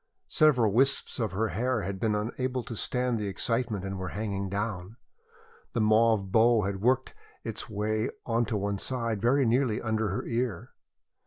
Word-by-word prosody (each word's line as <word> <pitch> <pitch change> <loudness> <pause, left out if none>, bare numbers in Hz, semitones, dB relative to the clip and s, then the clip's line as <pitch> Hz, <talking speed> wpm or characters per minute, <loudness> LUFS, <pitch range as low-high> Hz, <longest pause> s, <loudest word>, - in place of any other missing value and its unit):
Several 125 -9 +4
wisps 135 +3 +2
of 110 -5 -1
her 110 +3 0
hair 115 +4 -1
had 95 0 -4
been 110 -2 +1
unable 125 +4 -2
to 115 - -7
stand 125 +1 -1
the 105 - -2
excitement 110 0 -1
and 95 -1 -4
were 95 - -3
hanging 100 -2 -2
down. 100 0 -3 0.8
The 120 - 0
mauve 110 -2 +3
bow 115 +1 +5
had 95 0 -3
worked 130 +3 +2 0.3
its - - -4
way 110 +2 -1 0.2
on 115 0 +1
to 105 0 -1
one 100 0 -2
side 115 -4 -2
very 130 +4 +3
nearly 120 -1 +2
under 110 -2 -1
her 95 - -3
ear. 115 -6 -2
110 Hz, 170 wpm, -28 LUFS, 100-120 Hz, 0.8 s, bow